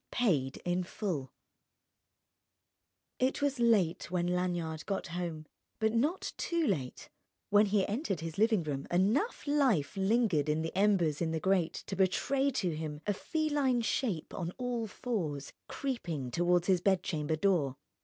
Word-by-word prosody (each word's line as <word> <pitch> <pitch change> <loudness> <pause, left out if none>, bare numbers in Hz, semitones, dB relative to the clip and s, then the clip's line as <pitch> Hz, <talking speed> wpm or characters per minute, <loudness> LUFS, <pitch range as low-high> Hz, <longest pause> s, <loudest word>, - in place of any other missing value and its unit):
IX - - -10
PAID 150 - +1
IN 180 +1 +1
FULL 170 - -3 1.9
It 260 +1 +1
was 285 -2 0
late 205 -10 +2
when 175 -1 0
Lanyard 175 -3 -1
got 195 -1 -2
home, 170 -3 -4 0.3
but 220 0 +1
not 295 +11 0
too 340 -2 0
late: 140 - -2 0.4
when 205 +1 +6
he 200 -1 +2
entered 205 - -2
his 165 +2 -5
living 220 -4 +3
room 140 -2 -4
enough 215 - +1
life 265 - +2
lingered 195 - +2
in 155 +1 +1
the 165 - -4
embers 185 -7 +2
in 165 - +1
the 160 0 -1
grate 185 -2 +1
to 195 - -4
betray 265 +9 +2
to 185 - -1
him 155 -1 -5
a 205 - +1
feline 290 -1 0
shape 225 - -1
on 170 -2 -3
all 245 -3 -2
fours 175 - -3
creeping 170 - -3
toward 175 +4 +2
his 185 -2 +3
bedchamber 175 -5 +1
door. 155 -7 +1
185 Hz, 150 wpm, -32 LUFS, 160-230 Hz, 1.9 s, when